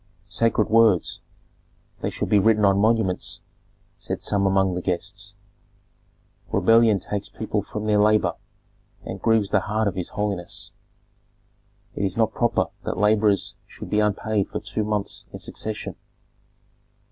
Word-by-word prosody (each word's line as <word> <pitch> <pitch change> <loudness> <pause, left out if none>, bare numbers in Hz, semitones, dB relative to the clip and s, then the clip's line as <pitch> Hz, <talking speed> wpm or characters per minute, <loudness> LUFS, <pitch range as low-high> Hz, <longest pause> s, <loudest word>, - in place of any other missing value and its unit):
"Sacred 115 -2 +1
words! 110 -5 +3 0.8
They - - -1
should - - -3
be 105 - +5
written 110 +1 +4
on 100 0 +4
monuments," 110 -3 +1 0.6
said - - -4
some 100 -1 +1
among 95 -1 +2
the 90 - -3
guests. 100 +3 -3 1.2
"Rebellion 115 -2 +4
takes 100 +2 -4
people - - -2
from 105 0 -6
their 105 -1 +3
labor 105 0 +3 0.7
and - - -6
grieves 110 -3 +2
the 105 - +4
heart 105 +2 -1
of 100 - 0
his 90 -1 -3
holiness. 100 -4 -3 1.2
It - - -3
is 95 0 -1
not 110 -1 +2
proper 120 -2 +1
that - - -3
laborers 105 -1 +2
should - - -10
be 105 - +2
unpaid 105 0 0
for - - -3
two 110 - -3
months 105 -1 -2
in - - -7
succession." 110 0 -4
105 Hz, 140 wpm, -24 LUFS, 100-110 Hz, 1.2 s, be